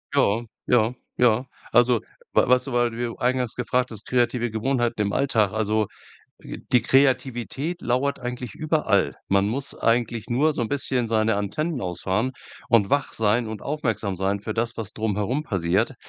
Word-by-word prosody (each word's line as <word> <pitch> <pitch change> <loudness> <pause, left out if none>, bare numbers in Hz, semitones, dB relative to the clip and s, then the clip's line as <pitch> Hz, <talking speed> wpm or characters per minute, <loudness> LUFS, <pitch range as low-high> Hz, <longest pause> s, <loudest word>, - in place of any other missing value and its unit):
Ja, 110 +4 +2 0.2
ja, 120 -1 +3 0.2
ja. 125 0 +3 0.3
Also, 120 -1 +4 0.3
wa - - +4
weißt 125 0 +4
du, 135 - -4
weil 120 0 +2
du 115 - -9
ja 120 -1 -1
eingangs 125 -1 0
gefragt 125 +1 -1
hast, 110 -1 -7
kreative 120 -1 +1
Gewohnheiten 120 +1 -1
im 100 -1 -1
Alltag. 115 -8 +2
Also 110 0 +1 0.6
d - - -7
die 125 - +5
Kreativität 135 +4 +1
lauert 130 +4 0
eigentlich 125 -3 -5
überall. 150 - +1
Man 100 +1 +3
muss 135 +5 -2
eigentlich 115 -1 0
nur 145 +6 +2
so - - -3
'n 115 - -2
bisschen 130 -3 0
seine 110 -1 +2
Antennen 145 - -2
ausfahren 95 +7 -1 0.4
und 110 -5 +4
wach 140 0 +1
sein 110 +2 +1
und 110 -2 -6
aufmerksam 115 -9 -2
sein 95 +2 0
für 110 +1 -5
das, 115 +1 -1
was 110 -2 -4
drumherum 110 +6 -1
passiert. 95 - 0
120 Hz, 170 wpm, -24 LUFS, 110-130 Hz, 0.6 s, die